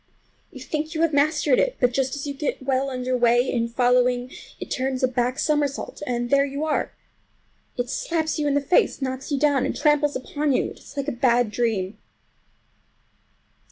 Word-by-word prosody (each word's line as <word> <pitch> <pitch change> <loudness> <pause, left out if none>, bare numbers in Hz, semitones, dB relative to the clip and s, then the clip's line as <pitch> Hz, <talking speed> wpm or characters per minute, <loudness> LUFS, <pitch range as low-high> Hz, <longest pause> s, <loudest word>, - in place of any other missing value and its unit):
You - - -11
think 310 +1 -4
you 320 - 0
have 325 -2 +2
mastered 285 -1 +3
it, - - +1
but 245 -1 +3
just 265 +1 0
as 285 - -5
you 285 - -3
get 280 -1 -3
well 265 0 0
under 255 -1 -2
way 240 +1 +3
in 235 -2 0
following, 245 +1 +2 0.3
it - - -8
turns 260 0 -1
a - - +5
back 250 +1 -1
somersault 295 -2 -1
and 240 -1 -2
there 280 0 +5
you 280 +2 -3
are. 310 - -1 0.9
It 245 0 -1
slaps 315 +4 -2
you 295 - 0
in 285 - +1
the 285 - +2
face, 315 +6 +2
knocks 260 +1 -4
you 285 - +1
down, 285 -2 +2
and - - -2
tramples 295 -1 +2
upon 290 +2 -1
you. - - 0
It - - -13
is - - -15
like 280 0 -2
a - - 0
bad 240 -2 +2
dream. 215 -4 -1
265 Hz, 195 wpm, -24 LUFS, 245-290 Hz, 0.9 s, a